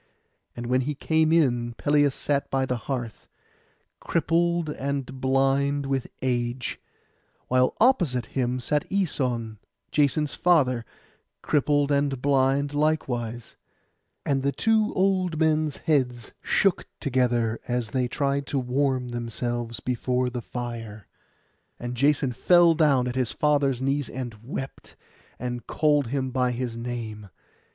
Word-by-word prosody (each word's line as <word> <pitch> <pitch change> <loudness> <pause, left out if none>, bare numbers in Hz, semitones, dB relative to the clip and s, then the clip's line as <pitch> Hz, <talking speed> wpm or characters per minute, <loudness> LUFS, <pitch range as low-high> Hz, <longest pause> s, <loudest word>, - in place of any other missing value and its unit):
And 120 - -5
when 130 +2 +2
he 145 +3 -2
came 160 +2 +2
in 120 -7 +2
Pelias 145 -1 +2
sat 140 -1 -1
by 135 -1 +1
the 125 - -1
hearth, 120 -5 -4 0.7
crippled 170 0 +1
and 135 -3 -4
blind 135 +2 +2
with 135 -2 -1 0.2
age; 120 -1 -1 0.7
while 130 0 +3
opposite 175 - +3
him 125 +1 -1
sat 150 +4 -1
Æson, 125 - -1 0.3
Jason's 150 0 +1
father, 130 -9 +2 0.6
crippled 145 0 +2
and 140 -2 +1
blind 140 +1 +2
likewise; 125 -6 -1 0.7
and 135 -1 +1
the 140 +1 +1
two 220 +5 +2
old 185 -4 +1
men's 155 -2 +1
heads 125 -7 0
shook 195 -2 +1
together 120 -4 +1
as 120 -3 -2
they 125 0 0
tried 140 +1 -1
to 140 - -2
warm 130 0 0
themselves 120 0 -3
before 125 0 -1
the 120 0 -4
fire. 115 -4 -6 0.7
And 120 0 -4
Jason 140 +1 +2
fell 175 +6 +5
down 140 -6 +3
at 125 - -2
his 130 -3 -1
father's 145 -5 +1
knees, 140 0 0
and 125 -3 -5
wept, 135 +2 -7 0.4
and 120 0 -5
called 145 -4 +2
him 130 +1 -2
by 125 -1 +1
his 120 -1 -3
name. 115 -3 -6
130 Hz, 130 wpm, -25 LUFS, 120-145 Hz, 0.7 s, fell